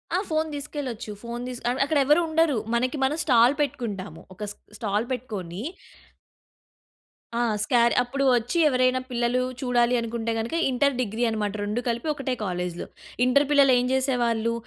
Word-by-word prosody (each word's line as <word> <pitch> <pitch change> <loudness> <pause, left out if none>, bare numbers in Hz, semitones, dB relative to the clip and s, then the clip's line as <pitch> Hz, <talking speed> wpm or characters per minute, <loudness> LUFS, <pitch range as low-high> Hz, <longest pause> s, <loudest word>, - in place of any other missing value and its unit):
ఆ! - - +3
Phone 315 0 0
తీసుకెళ్లొచ్చు. 275 -6 -5
Phone 235 +1 -5
తిస్ 250 -1 -6 0.3
అక్కడ 300 +2 0
ఎవరు 300 +5 +5
ఉండరు. 320 -2 +2 0.2
మనకి 255 +4 0
మనం 280 +4 +1
స్టాల్ 245 -2 +5
పెట్టుకుంటాము. 235 -9 -4
ఒక 200 - -8
స్ట - - -13 0.2
స్టాల్ 210 +1 -1
పెట్టుకొని 205 -8 -5 1.8
ఆ! - - +1 0.2
స్కార్ 235 -1 +3
అప్పుడు 270 +3 -2
వచ్చి 240 +8 -1
ఎవరైనా 255 -1 +2
పిల్లలు 245 0 0 0.2
చూడాలి 245 -1 +2
అనుకుంటే 230 0 -3
గనుక 225 +7 -3 0.2
ఇంటర్ 280 +2 +2
డిగ్రీ 230 0 -2
అన్నమాట. 210 -2 -2
2 210 +4 -2
కలిపి 235 +5 -2
ఒకటే 275 -3 -3
కాలేజ్‌లో 180 -2 -3 0.4
ఇంటర్ 280 +3 +4
పిల్లలు 280 -2 +6
ఏం 245 - 0
చేసేవాళ్ళు, 240 -4 +1
245 Hz, 145 wpm, -25 LUFS, 225-270 Hz, 1.8 s, పిల్లలు